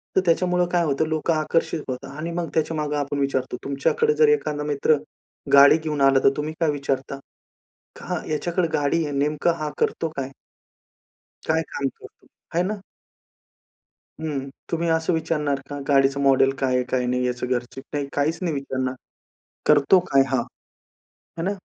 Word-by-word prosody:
तर 190 - +5
त्याच्यामुळं 180 +1 +2
काय 175 -1 +2
होतं? 150 +1 0
लोकं 160 +1 0
आकर्षित 155 0 0
होतात 125 0 -5
आणि 165 +2 -4
मग 170 -1 -3
त्याच्यामागे 155 -2 -1
आपण 145 0 -2
विचारतो, 130 -2 -1
तुमच्याकडे 430 - +1
जर 460 - +5
एखादा 150 - 0
मित्र 150 +1 +2 0.6
गाडी 140 +2 +8
घेऊन 155 -3 -3
आला 135 -1 +5
तर - - +7
तुम्ही 150 +1 -3
काय 165 -2 +2
विचारता? 140 -1 -3 0.8
खा - - -4
ह्याच्याकडे 170 +3 -1
गाडी 145 +3 +1
आहे 145 - -4
नेमकं 150 +4 +1
हा 155 -1 -2
करतो 165 - 0
काय? 135 -1 -3 1.2
काय 160 +1 +2
काम 140 - -2
करतो? - - -13 0.3
हाय 170 +2 +2
ना? 200 +1 -3 1.4
हं. 140 -4 -3 0.2
तुम्ही 165 0 0
असं 160 +2 +1
विचारणार 150 -3 0
का? 145 - -5
गाडीचं 135 -1 +3
मॉडेल 135 -1 +4
काय 130 -1 +1
आहे, 125 - +2
काय 125 -1 0
नाही? 125 0 0
याचं 125 0 -3
घरच. 125 0 -3 0.2
नाही, 145 -1 -2
काहीच 155 +3 0
नाही 175 -3 -1
विचारणार. 130 -1 -2 0.7
करतो 150 +5 +5
काय 135 0 +6
हा? 130 -2 +1 1.0
हे 165 - -2
ना? 190 - 0
150 Hz, 160 wpm, -23 LUFS, 135-165 Hz, 1.4 s, गाडी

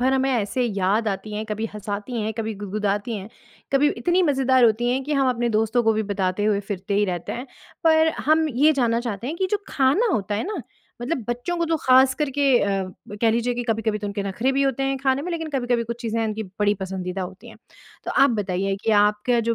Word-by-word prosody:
भर 260 +2 +2
हमें 265 0 +2
ऐसे 245 +1 0
याद 205 0 +1
आती 210 +1 -4
हैं, 215 +1 -3
कभी 215 +1 -3
हँसाती 210 +3 -4
हैं, 215 +1 -2
कभी 220 -1 -2
गुदगुदाती 205 +2 -2
हैं, 195 0 -7 0.4
कभी 280 +2 +4
इतनी 350 +10 +2
मज़ेदार 265 -4 +3
होती 230 +2 +3
हैं 260 +2 0
कि 300 - -3
हम 275 -2 +2
अपने 240 -1 0
दोस्तों 225 +2 +1
को 225 -1 +3
भी 220 0 0
बताते 200 -1 -1
हुए 210 -1 +2
फिरते 200 -1 -4
ही 205 +1 +3
रहते 175 -3 -3
हैं। 250 +3 -6 0.4
पर 320 0 +5 0.2
हम 315 +1 +4
ये 290 +4 +4
जानना 235 -5 +1
चाहते 230 -2 -4
हैं 310 +5 -3
कि 380 - 0
जो 420 -1 0
खाना 280 - +2
होता 205 - -1
है 210 - -1
ना, 395 -8 -4 0.4
मतलब 265 +1 -2
बच्चों 245 +9 -2
को 340 - +1
तो 325 0 +1
खासकर 260 +3 +4
के 285 +2 -1 0.2
अ, 195 -1 0 0.3
ब 205 - -7
कह 230 - +4
लीजिए 235 +2 0
कि 245 - -2
कभी-कभी 220 -1 0
तो 205 - -5
उनके 200 0 -3
नखरे 200 +6 -1
भी 275 - +1
होते 270 -1 0
हैं 270 0 0
खाने 265 +1 +1
में, 355 - -4
लेकिन 325 -1 -3
कभी-कभी 245 -4 0
कुछ 235 +1 -6
चीज़ें 230 -1 -1
उनकी 220 0 -2 0.2
बड़ी 205 0 +3
पसंदीदा 190 0 -4
होती 185 +1 -9
हैं। - - -13 0.5
तो - - -3
आप 275 0 +4
बताइए 195 -3 -1
कि 225 - +2
आपके 210 +4 +2
जो 230 - +2
230 Hz, 235 wpm, -23 LUFS, 205-265 Hz, 0.5 s, पर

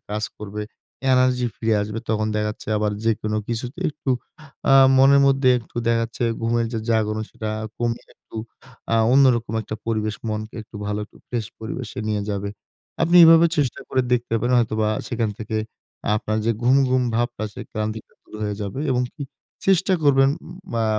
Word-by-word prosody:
কাজ 105 +1 -1
করবে। 105 0 -5 0.5
এনার্জি 125 -1 +3
ফিরে 110 -1 +1
আসবে। 105 +2 -4
তখন 110 0 +1
দেখা 105 0 0
যাচ্ছে 105 - -10
আবার 105 -1 0
যেকোনো 110 -1 0
কিছুতে 125 +8 -4
একটু 140 -2 -4 0.6
আ - - +8 0.2
মনের 140 +1 +7
মধ্যে 135 -1 +3
একটু 115 - -16
দেখা 115 0 +3
যাচ্ছে 115 +1 -4 0.2
ঘুমের 115 0 +1
যে 115 - -1
জাগন 110 -1 +1
সেটা 110 -1 -5 0.3
কমিয়ে 120 0 -2
একটু - - -14 0.6
আ - - +4 0.2
অন্যরকম 120 -5 +4
একটা 110 - -6
পরিবেশ। 110 -2 -1
মনকে 110 0 -4
একটু 110 - -13
ভালো 105 0 -2
একটু - - -23
ফ্রেশ 115 -3 -2
পরিবেশে 115 +1 -6
নিয়ে 105 -1 0
যাবে। 100 0 -3 0.5
আপনি 170 +2 +4
এভাবে 165 +1 +8
চেষ্টা 140 -4 0
করে 130 -1 +1
দেখতে 120 -1 +1
পারেন 125 +2 +1
হয়তোবা 110 -1 0 0.2
সেখান 115 -3 -1
থেকে 110 0 -4 0.6
আপনার 110 +1 -2
যে - - +4
ঘুম, 125 +3 +5
ঘুম 130 0 +3
ভাবটা 120 -1 -1
আছে। 105 - -9
ক্লান্তিটা 110 0 -4
দূর - - -18
হয়ে 105 -1 -2
যাবে 100 +7 -4
এবং 125 0 +2
হু 150 - -7 0.4
চেষ্টা 190 0 +4
করবেন 135 -1 +5 0.4
ম - - -4
আ - - +2
115 Hz, 175 wpm, -22 LUFS, 110-130 Hz, 0.6 s, আ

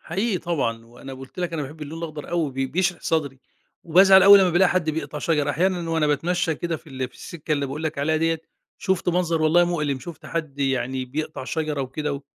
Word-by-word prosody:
حقيقي 195 +3 -1
طبعًا، 115 -10 -2
وأنا 125 +3 -10
قُلت 130 +5 -12
لك 175 -1 -2
أنا 160 -2 -2
باحب 150 +3 -8
اللون 155 +2 -7
الأخضر 155 -3 -6
أوي 170 -4 0
بي 135 +1 -1
بيشرح 175 +6 -1
صدري، 145 -5 -1 0.5
وبازعل 190 +3 +7
أوي 200 +1 +10
لما 190 -2 +4
بالاقي 175 +2 +4
حد 170 -3 +1
بيقطع 150 -1 -4
شجر، 150 -2 +1
أحيانًا 175 +1 0
وأنا 160 -2 +2
باتمشى 165 +3 0
كده 170 +1 -3
في - - -19
ال 130 -1 -4
في - - -27
السكة 160 -2 -6
اللي 140 -2 0
باقول 140 +4 -6
لك 155 -2 -3
عليها 155 +3 +1
ديَّة، 165 0 0 0.4
شُفْت 190 -3 -1
منظر 170 -2 +1
والله 165 +3 +5
مؤلم 150 -6 -1
شُفْت 160 +5 -10
حد 155 -4 -4
يعني 130 -1 -1
بيقطع 140 +1 -5
شجرة 155 0 -2
وكده، 145 +3 -3
و 140 - -6
155 Hz, 215 wpm, -23 LUFS, 140-175 Hz, 0.5 s, أوي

